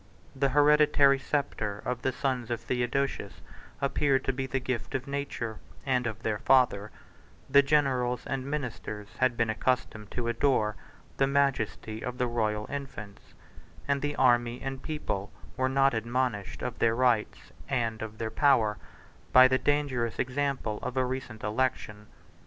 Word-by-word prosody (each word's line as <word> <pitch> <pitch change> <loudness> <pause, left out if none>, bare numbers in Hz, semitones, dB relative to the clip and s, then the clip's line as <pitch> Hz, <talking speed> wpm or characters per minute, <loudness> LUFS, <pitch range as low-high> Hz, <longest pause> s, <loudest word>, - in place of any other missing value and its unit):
The 135 0 +1
hereditary 145 -1 +5
sceptre 135 -8 -2
of 125 -1 -2
the 130 - 0
sons 130 -3 -2
of 120 -1 -1
Theodosius 125 +3 -2 0.4
appeared 140 -1 +1
to 135 - +1
be 130 +1 -3
the 135 0 -1
gift 125 -2 -3
of 130 -1 -2
nature, 140 -6 -4 0.3
and 125 -3 +1
of 110 -3 -6
their 105 -2 -1
father; 125 -6 +3 0.6
the 140 +1 +6
generals 135 -4 +1
and 130 - -3
ministers 125 -7 -5
had 130 -2 +2
been 115 -1 +1
accustomed 110 -2 -1
to 120 -1 -3
adore 120 -3 +1 0.4
the 135 - +3
majesty 130 -5 0
of 125 0 -4
the 125 - +1
royal 110 -3 -1
infants; 135 -8 -8 0.5
and 140 -1 +1
the 145 0 -2
army 120 -1 +3
and 135 -1 -5
people 120 -11 -4 0.2
were 130 -1 +1
not 135 0 +3
admonished 115 -2 -2
of 125 -2 -4
their 115 -1 +3
rights, 120 -3 +1 0.2
and 115 -4 -1
of 110 0 -6
their 110 -1 -3
power, 115 -8 +3 0.5
by 130 0 +9
the 130 0 +2
dangerous 135 -6 0
example 130 -4 -1
of 130 - -4
a 130 - +3
recent 125 -3 -5
election. 105 -2 -2
125 Hz, 150 wpm, -29 LUFS, 115-135 Hz, 0.6 s, by